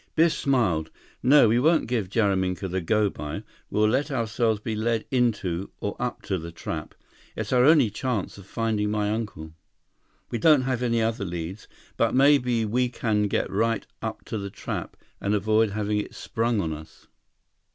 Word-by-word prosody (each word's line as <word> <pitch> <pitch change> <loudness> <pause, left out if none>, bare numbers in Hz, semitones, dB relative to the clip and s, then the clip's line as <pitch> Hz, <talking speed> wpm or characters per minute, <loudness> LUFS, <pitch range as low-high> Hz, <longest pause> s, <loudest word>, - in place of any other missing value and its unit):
114 165 - +6
Biff 170 - +2
smiled. 95 - +1 0.3
"No, 135 0 +6
we 115 +3 +3
won't 160 +5 +3
give 110 -6 -1
Jaraminka 95 -3 +1
the 95 +1 -2
'go 105 +4 +2
by.' 75 +7 -6 0.3
We'll 105 +1 +2
let 135 +7 +1
ourselves 115 -3 0
be 110 +1 -3
led 115 +1 0
into—or 100 -6 -1
up 125 0 -3
to 95 -2 -2
the 85 +1 -7
trap. 80 -1 -6 0.4
It's - - -3
our 125 -1 +5
only 145 -8 +5
chance 105 -3 -3
of 95 - -14
finding 110 -2 -1
my 105 0 0
uncle. 100 -8 -4 0.8
We 120 - -1
don't 150 +1 +5
have 130 -2 -1
any 115 -2 +1
other 110 -1 -1
leads. 90 +2 -5 0.3
But - - +2
maybe 130 -4 +4
we 125 +4 +1
can 105 -3 0
get - - 0
right 115 +2 0 0.2
up - - -5
to 110 - -4
the 100 0 -5
trap - - -6 0.2
and 100 +1 +1
avoid 110 +2 +2
having 105 0 -1
it 105 - -6
sprung 115 -1 -1
on 80 -3 -2
us." 80 +1 -12
110 Hz, 175 wpm, -25 LUFS, 100-120 Hz, 0.8 s, 114